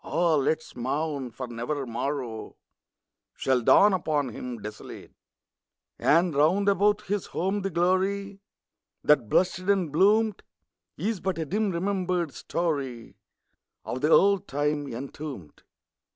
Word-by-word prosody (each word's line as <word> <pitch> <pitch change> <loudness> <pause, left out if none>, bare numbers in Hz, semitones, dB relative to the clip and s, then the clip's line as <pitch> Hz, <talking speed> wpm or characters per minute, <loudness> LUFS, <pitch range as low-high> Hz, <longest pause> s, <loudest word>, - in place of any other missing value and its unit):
(Ah, 170 -1 +1
let 155 +1 +2
us 160 - -16
mourn! 140 +2 -2
for 125 +3 -7
never 125 +4 -4
morrow 120 -1 -4 0.8
Shall 130 -2 +1
dawn 200 - +6
upon 155 -6 0
him 120 +1 -6
desolate 105 0 -9 0.5
!) - - -59
And 170 +2 +3
round 165 +8 +3
about 205 +1 +3
his 205 -1 -2
home 195 +3 -1
the 195 - -2
glory 195 +3 0 0.6
That 135 -8 +3
blushed 180 -1 +2
and 185 -4 0
bloomed, 205 +6 +3 0.6
Is 210 +4 -2
but 190 -2 -2
a 160 - -2
dim 210 +7 0
remembered 180 -3 -1
story 135 -6 -3 0.7
Of 130 - -4
the 150 - +2
old 200 +3 +4
time 145 0 -1
entombed. 130 - -8
160 Hz, 130 wpm, -26 LUFS, 135-190 Hz, 0.8 s, dawn